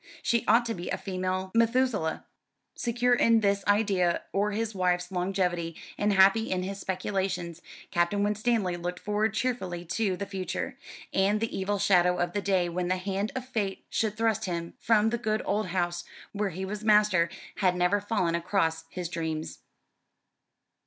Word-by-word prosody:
She 235 Hz, -2 st, +2 dB
ought 235 Hz, +2 st, +5 dB
to 230 Hz, -, -1 dB
be 175 Hz, -4 st, -6 dB
a -, -, -1 dB
female 185 Hz, 0 st, -3 dB
Methuselah." 230 Hz, -7 st, +1 dB, 0.5 s
Secure 245 Hz, +1 st, +1 dB
in 230 Hz, -2 st, +4 dB
this 200 Hz, -1 st, +1 dB
idea 200 Hz, -4 st, +2 dB
of 205 Hz, +2 st, +1 dB
his 220 Hz, +1 st, -2 dB
wife's 180 Hz, -1 st, 0 dB
longevity, 180 Hz, -2 st, -1 dB, 0.2 s
and 205 Hz, 0 st, +1 dB
happy 195 Hz, +4 st, +5 dB
in 185 Hz, -1 st, 0 dB
his 195 Hz, +1 st, -5 dB
speculations, 185 Hz, -3 st, -2 dB, 0.3 s
Captain 175 Hz, +4 st, +1 dB
Winstanley 210 Hz, -3 st, +1 dB
looked 175 Hz, +1 st, -4 dB
forward 215 Hz, +1 st, 0 dB
cheerfully 190 Hz, -8 st, -2 dB
to 190 Hz, +1 st, -1 dB
the 200 Hz, -, -3 dB
future: 190 Hz, -2 st, -4 dB, 0.4 s
and 200 Hz, +2 st, +2 dB
the 225 Hz, +1 st, -2 dB
evil 205 Hz, +2 st, -1 dB
shadow 180 Hz, -3 st, +3 dB
of 175 Hz, 0 st, -1 dB
the 205 Hz, -, -1 dB
day 190 Hz, -3 st, +1 dB
when 175 Hz, +1 st, -2 dB
the 185 Hz, +1 st, +1 dB
hand 195 Hz, +2 st, -2 dB
of 260 Hz, -1 st, -3 dB
fate 205 Hz, -6 st, -3 dB
should 215 Hz, -1 st, 0 dB
thrust 220 Hz, -1 st, +1 dB
him 170 Hz, -2 st, -4 dB
from 225 Hz, -2 st, +3 dB
the 235 Hz, -, -1 dB
good 215 Hz, -2 st, -1 dB
old 210 Hz, 0 st, 0 dB
house 175 Hz, -1 st, -1 dB, 0.3 s
where 205 Hz, -1 st, -1 dB
he 190 Hz, +2 st, -5 dB
was 210 Hz, +2 st, -5 dB
master 210 Hz, -5 st, +4 dB, 0.3 s
had 185 Hz, -2 st, +2 dB
never 180 Hz, +3 st, +2 dB
fallen 195 Hz, -5 st, 0 dB
across 165 Hz, -2 st, 0 dB
his 180 Hz, 0 st, -4 dB
dreams. 160 Hz, -2 st, -4 dB
195 Hz, 165 wpm, -28 LUFS, 180-215 Hz, 0.5 s, ought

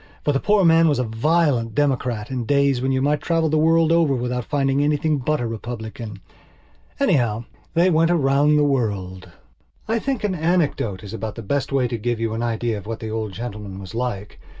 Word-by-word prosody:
For 145 Hz, -, +3 dB
the 135 Hz, -, +1 dB
poor 210 Hz, +7 st, +2 dB
old 180 Hz, -, +4 dB
man 165 Hz, 0 st, +5 dB
was 145 Hz, -, +2 dB
a 125 Hz, -, +1 dB
violent 120 Hz, 0 st, +1 dB
Democrat 125 Hz, -6 st, 0 dB
in 125 Hz, -3 st, -3 dB
days 140 Hz, -1 st, +2 dB
when 130 Hz, +1 st, 0 dB
you 130 Hz, 0 st, +1 dB
might 145 Hz, +1 st, +1 dB
travel 165 Hz, -2 st, +1 dB
the 155 Hz, +1 st, +2 dB
world 165 Hz, +1 st, +3 dB
over 165 Hz, -5 st, +3 dB
without 125 Hz, -1 st, -2 dB
finding 140 Hz, 0 st, +1 dB
anything 150 Hz, 0 st, +1 dB
but 150 Hz, +4 st, 0 dB
a 120 Hz, -, -2 dB
Republican. 110 Hz, -2 st, -6 dB, 0.8 s
Anyhow, 120 Hz, -, +1 dB, 0.3 s
they 175 Hz, +2 st, +4 dB
went 165 Hz, +1 st, +3 dB
round 145 Hz, -2 st, +3 dB
the 150 Hz, -, +4 dB
world. 100 Hz, -10 st, -1 dB, 0.6 s
I 225 Hz, +1 st, +1 dB
think 265 Hz, -2 st, -2 dB
an 205 Hz, -2 st, 0 dB
anecdote 160 Hz, -, 0 dB
is 100 Hz, +1 st, -8 dB
about 110 Hz, -1 st, -5 dB
the 115 Hz, -, -7 dB
best 140 Hz, +7 st, -1 dB
way 135 Hz, -2 st, +2 dB
to 120 Hz, -1 st, -4 dB
give 120 Hz, +1 st, -2 dB
you 115 Hz, -1 st, -1 dB
an 115 Hz, -, -3 dB
idea 115 Hz, -2 st, -1 dB
of 100 Hz, -, -13 dB
what 115 Hz, 0 st, -4 dB
the 110 Hz, -1 st, -5 dB
old 110 Hz, -2 st, -3 dB
gentleman 105 Hz, -3 st, -6 dB
was 95 Hz, +1 st, -9 dB
like. 115 Hz, -4 st, -4 dB
130 Hz, 210 wpm, -22 LUFS, 115-155 Hz, 0.8 s, man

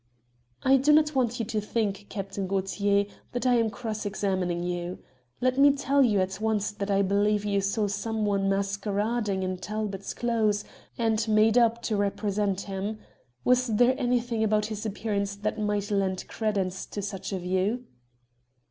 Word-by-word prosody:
"I 270 Hz, +1 st, +6 dB
do 275 Hz, +3 st, +3 dB
not 305 Hz, 0 st, +4 dB
want 245 Hz, -3 st, +1 dB
you 230 Hz, -, -1 dB
to 215 Hz, -1 st, -2 dB
think, 205 Hz, -2 st, -2 dB
Captain 195 Hz, -1 st, -4 dB
Gaultier, 200 Hz, +1 st, +1 dB, 0.3 s
that 245 Hz, +1 st, -2 dB
I 250 Hz, -, +4 dB
am 225 Hz, -1 st, +2 dB
cross 220 Hz, -2 st, -5 dB
examining 185 Hz, -4 st, -1 dB
you. 175 Hz, 0 st, -3 dB, 0.4 s
Let 255 Hz, +1 st, +2 dB
me 285 Hz, 0 st, +7 dB
tell 280 Hz, 0 st, +2 dB
you 220 Hz, -6 st, +4 dB
at 190 Hz, +2 st, -3 dB
once 215 Hz, -2 st, 0 dB
that 205 Hz, -1 st, -5 dB
I 200 Hz, 0 st, +3 dB
believe 205 Hz, +2 st, +2 dB
you 200 Hz, -1 st, +1 dB
saw 205 Hz, +2 st, 0 dB
someone 205 Hz, -1 st, 0 dB
masquerading 200 Hz, +1 st, -1 dB
in 185 Hz, 0 st, -2 dB
Talbot's 205 Hz, 0 st, -4 dB
clothes, 220 Hz, -3 st, +1 dB, 0.3 s
and 225 Hz, -1 st, +1 dB
made 215 Hz, +1 st, +4 dB
up 235 Hz, -1 st, +3 dB
to 220 Hz, -, 0 dB
represent 200 Hz, -1 st, 0 dB
him. 200 Hz, +2 st, -4 dB, 0.5 s
Was 250 Hz, 0 st, +3 dB
there 240 Hz, +3 st, +4 dB
anything 240 Hz, -3 st, 0 dB
about 215 Hz, -1 st, +2 dB
his 215 Hz, 0 st, -4 dB
appearance 200 Hz, -1 st, -2 dB
that 215 Hz, +2 st, -3 dB
might 210 Hz, -1 st, -1 dB
lend 190 Hz, -2 st, 0 dB
credence 195 Hz, -4 st, -2 dB
to 205 Hz, -, -5 dB
such 195 Hz, -1 st, -5 dB
a 195 Hz, -, -1 dB
view?" 190 Hz, +7 st, -1 dB
210 Hz, 165 wpm, -27 LUFS, 195-225 Hz, 0.5 s, me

